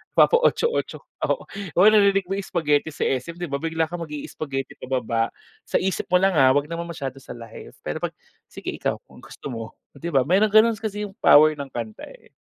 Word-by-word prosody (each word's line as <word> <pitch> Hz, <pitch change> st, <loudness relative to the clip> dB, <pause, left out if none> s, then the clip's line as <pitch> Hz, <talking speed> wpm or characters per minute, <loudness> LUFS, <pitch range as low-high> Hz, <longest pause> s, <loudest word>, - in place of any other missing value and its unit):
napapa-Otso-Otso 475 Hz, 0 st, +2 dB, 0.2 s
oo. -, -, -1 dB, 0.3 s
Oo 185 Hz, +4 st, +6 dB
narinig 200 Hz, -2 st, +4 dB
mo 195 Hz, +2 st, -3 dB
yung 195 Hz, -, -6 dB
Spagheti 150 Hz, -3 st, +2 dB
sa 155 Hz, -, -4 dB
SM, 135 Hz, +6 st, -1 dB
'di 175 Hz, -3 st, -6 dB
ba, 140 Hz, -, -1 dB
bigla 165 Hz, +1 st, -1 dB
kang 170 Hz, +2 st, -4 dB
mag-i 150 Hz, -3 st, -6 dB
spaghetti 135 Hz, -3 st, -5 dB
pababa. 120 Hz, -3 st, -1 dB, 0.4 s
Sa -, -, -4 dB
isip 190 Hz, -1 st, 0 dB
mo 180 Hz, -, +1 dB
lang, 190 Hz, +2 st, +4 dB
ah, 130 Hz, -1 st, +6 dB
'wag 145 Hz, +2 st, 0 dB
naman 170 Hz, 0 st, -4 dB
masyado 135 Hz, -5 st, -6 dB
sa 130 Hz, -, -10 dB
live 115 Hz, -2 st, -11 dB
pero -, -, -3 dB
pag -, -, -4 dB, 0.3 s
sige -, -, -6 dB
ikaw -, -, -2 dB, 0.2 s
ang -, -, -15 dB
gusto 140 Hz, -, -9 dB
mo, 115 Hz, -2 st, -7 dB, 0.2 s
'di 170 Hz, -, -5 dB
ba, 135 Hz, -6 st, +3 dB
mayrong 190 Hz, +9 st, +3 dB
ganun 220 Hz, 0 st, +5 dB
kasi 210 Hz, -1 st, -4 dB
yung 205 Hz, -, -6 dB
power 155 Hz, +1 st, +7 dB
ng 145 Hz, -2 st, -6 dB
kanta, 115 Hz, -4 st, -7 dB
eh. -, -, -16 dB
160 Hz, 205 wpm, -23 LUFS, 135-190 Hz, 0.4 s, power